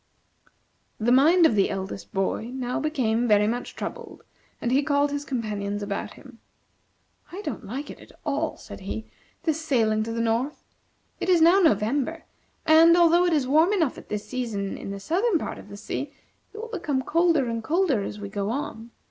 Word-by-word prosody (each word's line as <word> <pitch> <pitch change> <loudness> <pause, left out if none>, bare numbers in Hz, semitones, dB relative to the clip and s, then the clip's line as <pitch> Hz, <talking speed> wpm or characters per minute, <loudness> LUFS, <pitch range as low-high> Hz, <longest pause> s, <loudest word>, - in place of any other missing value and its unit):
The 230 +2 +1
mind 320 +7 +6
of 280 - +4
the 200 -2 +2
eldest 195 0 -5
boy 195 +3 -1
now 250 -1 -2
became 245 -6 0
very 210 -1 +4
much 240 +3 -3
troubled, - - -7 0.4
and 240 - -2
he 270 +2 +4
called 285 -1 +1
his 285 0 -3
companions 210 -6 -3
about 200 0 -4
him. 255 -3 -15 0.9
"I 385 +4 -7
don't - - -5
like 275 +7 -5
at - - -14
all," 300 +2 -1
said - - -10
he, 200 +3 -5 0.4
"this 320 -1 -1
sailing 225 -7 +2
to 225 +1 -3
the 230 - -3
north. 230 +6 -1 0.6
It - - -2
is 355 -2 +5
now 340 +4 +6
November, 290 - +1 0.4
and, 325 +2 +7
although 345 +1 +5
it 345 - +2
is 290 -4 +2
warm 315 +9 +4
enough 325 -10 +1
at - - -13
this 210 -1 -4
season 225 -6 -3
in - - -7
the 200 0 -5
southern 360 - +1
part - - -5
of - - -13
the 200 - -9
sea, 275 +7 -5 0.4
it - - -12
will 455 +2 -6
become 295 - -2
colder 330 -4 +2
and 230 -1 -3
colder 320 - +1
as 205 +1 -5
we 205 - -6
go 200 +1 -3
on. 235 -3 -4
260 Hz, 190 wpm, -25 LUFS, 220-320 Hz, 0.9 s, and